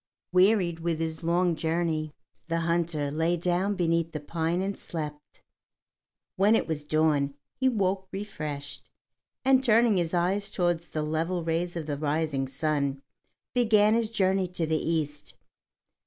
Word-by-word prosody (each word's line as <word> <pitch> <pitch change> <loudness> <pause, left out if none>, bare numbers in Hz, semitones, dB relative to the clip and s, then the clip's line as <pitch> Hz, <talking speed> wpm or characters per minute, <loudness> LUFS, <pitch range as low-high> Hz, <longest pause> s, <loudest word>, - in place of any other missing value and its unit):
Wearied 185 -2 +3
with 165 -1 -1
his 160 0 -3
long 170 +1 +2
journey, 160 -1 -1 0.4
the 165 0 0
hunter 165 -3 0
lay 165 +3 +1
down 180 +4 0
beneath 165 -2 0
the 150 - -3
pine 165 +3 -1
and 200 +1 -2
slept. 150 -3 -7 0.9
When 205 +4 +5
it - - +1
was 155 -2 -3
dawn 150 -2 +1 0.2
he 260 - +2
woke 190 -4 0
refreshed, 155 -8 -6 0.6
and 265 0 +5
turning 230 -3 +4
his 170 -2 0
eyes 190 +4 +1
toward 175 -2 +1
the 160 -2 -5
level 165 +3 -1
rays 165 +2 -1
of 165 -2 -3
the 145 -2 -3
rising 150 -2 0
sun, 140 0 -1 0.5
began 215 -3 +4
his 230 -1 +1
journey 190 -3 +1
to 175 -2 -2
the 155 0 0
east. 150 -3 -2
165 Hz, 145 wpm, -28 LUFS, 155-185 Hz, 0.9 s, When